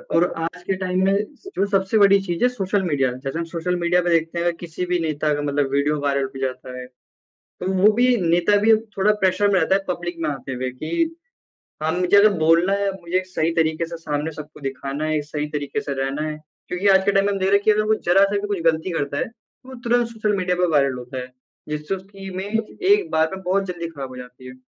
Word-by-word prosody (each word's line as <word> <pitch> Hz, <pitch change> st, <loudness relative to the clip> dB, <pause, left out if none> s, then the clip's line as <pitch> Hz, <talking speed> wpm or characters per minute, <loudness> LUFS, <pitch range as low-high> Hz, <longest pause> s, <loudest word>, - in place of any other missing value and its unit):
और 170 Hz, -, +5 dB
आज 165 Hz, +2 st, -4 dB
के 195 Hz, -, -1 dB
टाइम 185 Hz, 0 st, 0 dB
में 195 Hz, -, +3 dB, 0.3 s
स 390 Hz, -, -11 dB
जो 200 Hz, -, +2 dB
सबसे 195 Hz, +2 st, +1 dB
बड़ी 200 Hz, -1 st, +6 dB
चीज़ 175 Hz, +1 st, -2 dB
है -, -, +6 dB
सोशल 200 Hz, -4 st, -1 dB
मीडिया। 135 Hz, -7 st, +1 dB
जैसे 135 Hz, +4 st, -5 dB
हम 170 Hz, -, -2 dB
सोशल 170 Hz, +2 st, -2 dB
मीडिया 175 Hz, +1 st, +2 dB
पे 175 Hz, -, -1 dB
देखते 165 Hz, 0 st, +1 dB
हैं 170 Hz, -, 0 dB
अगर 170 Hz, -1 st, +1 dB
किसी 175 Hz, +1 st, -5 dB
भी 180 Hz, 0 st, 0 dB
नेता 155 Hz, -1 st, 0 dB
का 145 Hz, -, -3 dB
मतलब 145 Hz, -1 st, 0 dB
वीडियो 145 Hz, +1 st, +1 dB
वायरल 140 Hz, -1 st, +1 dB
हो 135 Hz, 0 st, -8 dB
जाता 130 Hz, -1 st, -4 dB
है, 125 Hz, -, -7 dB, 0.5 s
तो 185 Hz, +1 st, -6 dB
वो 200 Hz, +3 st, +5 dB
भी 245 Hz, +2 st, +3 dB
नेता 175 Hz, +4 st, +3 dB
भी 220 Hz, +1 st, +6 dB, 0.2 s
थोड़ा 200 Hz, +2 st, +4 dB
प्रेशर 190 Hz, +2 st, +3 dB
में 190 Hz, -, +4 dB
रहता 190 Hz, -, +2 dB
है 195 Hz, -, +1 dB
पब्लिक 175 Hz, -1 st, -3 dB
में 155 Hz, -2 st, -1 dB
आते 135 Hz, -1 st, -5 dB
हुए। 130 Hz, +1 st, -3 dB
कि 170 Hz, -, -2 dB, 0.7 s
हाँ, 160 Hz, +1 st, +1 dB
मुझे 180 Hz, +2 st, +3 dB
अगर 210 Hz, +1 st, +8 dB
बोलना 165 Hz, +4 st, +4 dB
है 200 Hz, 0 st, +1 dB
मुझे 170 Hz, +2 st, -2 dB
एक 185 Hz, -, -4 dB
सही 165 Hz, -3 st, 0 dB
तरीके 160 Hz, 0 st, +1 dB
से 170 Hz, 0 st, -7 dB
सामने 150 Hz, -1 st, -3 dB
सबको 150 Hz, 0 st, -10 dB
दिखाना 135 Hz, +2 st, -4 dB
है, 155 Hz, -1 st, 0 dB
सही 150 Hz, 0 st, -4 dB
तरीके 150 Hz, +7 st, -3 dB
से 145 Hz, -9 st, -4 dB
रहना 135 Hz, +3 st, -2 dB
है। 150 Hz, -, -4 dB, 0.3 s
क्योंकि 185 Hz, +3 st, 0 dB
आज 190 Hz, 0 st, +5 dB
के 200 Hz, -, +3 dB
टाइम 195 Hz, 0 st, +3 dB
में 205 Hz, -, +1 dB
हम 195 Hz, -, -2 dB
देख 190 Hz, 0 st, +1 dB
रहे 200 Hz, -, +5 dB
हैं 200 Hz, -, -1 dB
कि 215 Hz, -, +5 dB
अगर 215 Hz, 0 st, +3 dB
वो 215 Hz, +1 st, +2 dB
ज़रा-सा 195 Hz, +3 st, +4 dB
भी 205 Hz, -, -4 dB
कुछ 200 Hz, -4 st, -2 dB
गलती 165 Hz, +2 st, +2 dB
करता 145 Hz, -4 st, -2 dB
है 255 Hz, -, +1 dB
तो 235 Hz, +3 st, -25 dB
वो 260 Hz, -, -9 dB
तुरंत 240 Hz, 0 st, +2 dB
सोशल 215 Hz, -3 st, -1 dB
मीडिया 180 Hz, -1 st, 0 dB
पे 180 Hz, 0 st, +2 dB
वायरल 140 Hz, -3 st, +3 dB
होता 125 Hz, +1 st, -7 dB
है। 125 Hz, 0 st, -7 dB, 0.4 s
जिससे 150 Hz, +5 st, -3 dB
उसकी 195 Hz, +1 st, -10 dB
इमेज 205 Hz, +4 st, -3 dB
एक 410 Hz, -1 st, +4 dB
बार 160 Hz, 0 st, +2 dB
में 190 Hz, -, -8 dB
बहुत 195 Hz, +2 st, +1 dB
जल्दी 175 Hz, -2 st, -4 dB
खराब 140 Hz, -4 st, -7 dB
हो 130 Hz, -, -11 dB
जाती 125 Hz, 0 st, -11 dB
है। 125 Hz, -, -10 dB
175 Hz, 255 wpm, -22 LUFS, 150-195 Hz, 0.7 s, अगर